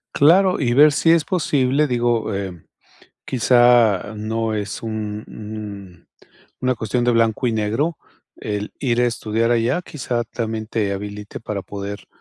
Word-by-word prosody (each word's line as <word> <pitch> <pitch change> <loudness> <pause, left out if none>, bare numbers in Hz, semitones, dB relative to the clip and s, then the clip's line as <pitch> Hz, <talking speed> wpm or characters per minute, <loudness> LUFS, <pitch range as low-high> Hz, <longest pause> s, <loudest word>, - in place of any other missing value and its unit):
Claro, 180 +6 +5
y 120 -4 +1
ver 150 +3 +7
si 165 +3 +3
es 165 -2 +4
posible, 145 -4 +1
digo, 120 -3 0
eh, 95 -4 -5 0.6
quizá 120 -4 +3
no 110 +1 -2
es 105 -1 -4
un 110 -1 -4
un 100 -5 -9 0.5
una 130 0 +1
cuestión 120 +3 -1
de 120 - +3
blanco 115 +1 +2
y - - -1
negro, 115 +10 -1 0.4
el 105 0 -4
ir 120 -3 0
a 125 - +3
estudiar 115 0 -1
allá, 120 +8 +1
quizá 125 -7 -3
también 110 -1 -4
te 105 -3 -1
habilite 105 +1 -6
para 105 -3 -4
poder, 100 +2 -7
115 Hz, 145 wpm, -21 LUFS, 105-125 Hz, 0.6 s, ver